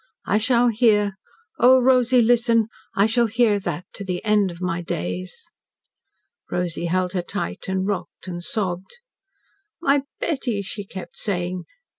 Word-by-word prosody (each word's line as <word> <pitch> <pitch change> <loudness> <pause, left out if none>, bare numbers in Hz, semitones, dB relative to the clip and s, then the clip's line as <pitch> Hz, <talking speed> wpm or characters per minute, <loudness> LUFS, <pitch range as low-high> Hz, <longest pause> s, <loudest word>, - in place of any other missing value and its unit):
I 210 - +2
shall 240 +1 +3
hear 210 -3 +3 0.5
O 260 +2 +7
Rosy, 250 -1 +4
listen! 230 -1 +3 0.3
I 200 - +4
shall 235 +1 +3
hear 225 -2 +2
that 180 -2 -4
to 200 - -6
the 180 +1 -4
end 210 -2 +3
of 170 -1 -9
my 180 -1 -2
days." 90 - -4 1.1
Rosy 175 -1 -2
held 180 +1 0
her 180 - 0
tight, 90 - -5
and 190 0 -1
rocked 200 -1 -4
and 175 -1 -5
sobbed. 190 - -3 0.8
"My 280 -4 +3 0.2
Betty," 250 -10 -1
she 200 +1 -6
kept 190 -1 -9
saying. 180 -3 -2
205 Hz, 145 wpm, -23 LUFS, 180-235 Hz, 1.1 s, O